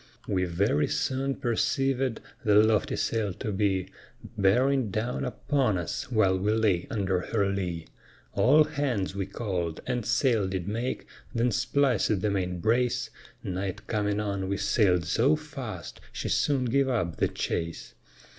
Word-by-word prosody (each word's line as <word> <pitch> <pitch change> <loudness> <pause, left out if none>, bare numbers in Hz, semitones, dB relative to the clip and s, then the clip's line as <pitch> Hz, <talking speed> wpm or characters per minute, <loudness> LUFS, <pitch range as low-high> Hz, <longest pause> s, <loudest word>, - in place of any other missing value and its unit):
We 90 -1 +1
very 85 -4 +1
soon 135 -1 -1
perceivèd 135 0 0 0.3
the 105 -1 +3
lofty 110 0 +4
sail 110 -4 -1
to 105 +1 -4
be 95 -2 0 0.5
Bearing 125 +5 +3
down 110 +5 -2
upon 130 -9 0
us 90 +8 -4
while 95 -5 +3
we 105 +3 +1
lay 105 -6 +1
under 95 -4 0
her 100 +2 0
lee; 90 -4 -2 0.5
All 150 +5 +5
hands 140 -11 -2
we 95 -1 -3
call'd, 90 -6 -3
and 125 -2 -1
sail 120 -3 +2
did 95 -1 -3
make, 115 +5 -3 0.3
then 115 +2 +2
splicèd 125 -9 +1
the 105 - +1
main 90 -2 -1
brace, 120 +5 +1 0.3
Night 95 0 -4
coming 105 -2 0
on, 100 -2 -2
we 100 - 0
sail'd 90 -7 +2
so 125 - +3
fast, 145 -7 -7
she - - -4
soon 135 -3 +1
gave 135 +3 +2
up 90 -10 -1
the - - +2
chase. 85 0 -4
105 Hz, 145 wpm, -28 LUFS, 95-125 Hz, 0.5 s, All